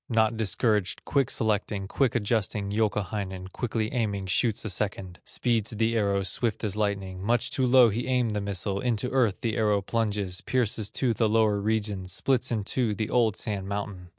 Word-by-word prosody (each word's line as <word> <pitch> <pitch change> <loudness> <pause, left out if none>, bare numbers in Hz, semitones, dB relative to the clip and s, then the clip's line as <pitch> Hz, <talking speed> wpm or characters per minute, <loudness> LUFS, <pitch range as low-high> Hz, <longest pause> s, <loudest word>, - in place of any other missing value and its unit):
Not 115 -1 +2
discouraged, 105 -1 0
quick 140 -3 +1
selecting, 105 -2 -1
Quick 130 +4 +1
adjusting, 105 -3 0
Youkahainen, 100 -3 -2
Quickly 110 -2 -2
aiming, 100 -5 -1
shoots 105 +5 +1
a - - -1
second. 95 -2 -3
Speeds 115 -3 0
the 115 +1 0
arrow 100 -3 +1
swift 105 +5 -1
as 105 -2 -1
lightning; 100 -3 -2
Much 115 +4 +1
too 130 -2 +1
low 125 -1 +7
he 115 +4 -3
aimed 125 -3 +1
the 105 -1 -1
missile, 100 0 -2
Into 120 +1 -1
earth 120 -7 +1
the 115 -1 -1
arrow 105 -3 +2
plunges, 105 -4 -1
Pierces 115 -5 0
to 125 -3 0
the 110 -1 +1
lower 110 -2 +3
regions, 105 -4 -1
Splits 130 +4 0
in 110 -3 0
two 110 0 0
the 110 +2 -3
old 115 -4 +3
Sand 100 -4 -4
Mountain. 100 -3 -5
105 Hz, 180 wpm, -27 LUFS, 100-115 Hz, -, low